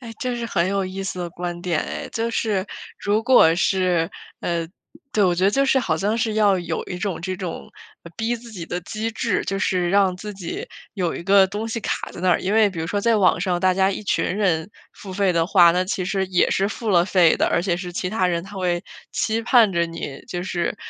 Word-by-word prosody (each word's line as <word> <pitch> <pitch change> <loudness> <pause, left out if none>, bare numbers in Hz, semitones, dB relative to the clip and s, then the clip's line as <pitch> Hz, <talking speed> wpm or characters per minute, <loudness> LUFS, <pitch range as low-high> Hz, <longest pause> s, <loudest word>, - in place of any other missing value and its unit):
哎， 230 -3 -9
这 250 -3 -2
是 235 - -4
很 175 -5 0
有 195 0 0
意 190 +1 -5
思 190 -1 -4
的 175 -1 -4
观 175 0 -5
点 170 -4 0
哎。 - - -5
就 230 +1 -1
是 210 -4 -1 0.3
如 210 +2 +1
果 235 -10 +6
是 180 -2 +1 0.3
呃， 170 -1 -2 0.5
对， 210 -2 +3
我 180 - +3
觉 180 +2 0
得 195 - +5
就 275 +6 +2
是 265 0 +3
好 170 -11 0
像 205 +6 0
是 220 -1 -1
要 205 -3 +3
有 170 -2 -3
一 180 -1 -6
种 190 -4 -3
这 185 +2 -3
种 180 -4 -6 0.5
逼 230 +2 -1
自 235 0 -13
己 175 -6 -7
的 180 - -3
机 220 +5 -4
制， 225 -2 -1
就 195 - -1
是 180 -3 0
让 195 -1 +3
自 210 +3 -7
己 185 -3 -6 0.3
有 180 -5 -1
一 - - -6
个 195 +1 +5
东 205 +3 -4
西 230 +1 -3
卡 - - -3
在 - - -9
那 185 0 +2
儿。 175 - +3
因 190 - -1
为 220 -1 +5
比 190 -4 -8
如 160 - -2
说 205 +3 -1
在 230 +1 +3
网 185 -4 +3
上 180 -1 0
大 185 +1 +3
家 190 0 +3
一 200 - -4
群 200 - 0
人 185 -3 0 0.2
付 190 -2 -10
费 195 -1 +1
的 165 -1 +1
话， 175 -3 +6
那 180 +2 +1
其 185 0 -2
实 190 +1 -1
也 185 -1 +2
是 195 +1 +1
付 220 0 -4
了 175 -3 +4
费 180 -4 +4
的， - - +2
而 170 - +1
且 180 -3 0
是 180 0 -6
其 180 +1 -3
他 200 -4 +1
人 170 -1 -1
他 200 +1 -11
会 175 -2 -1 0.3
期 220 0 -1
盼 230 -4 +5
着 170 -1 +1
你 165 -4 -7
就 175 - -4
是 180 +1 -2
190 Hz, 265 characters per minute, -22 LUFS, 175-210 Hz, 0.5 s, 果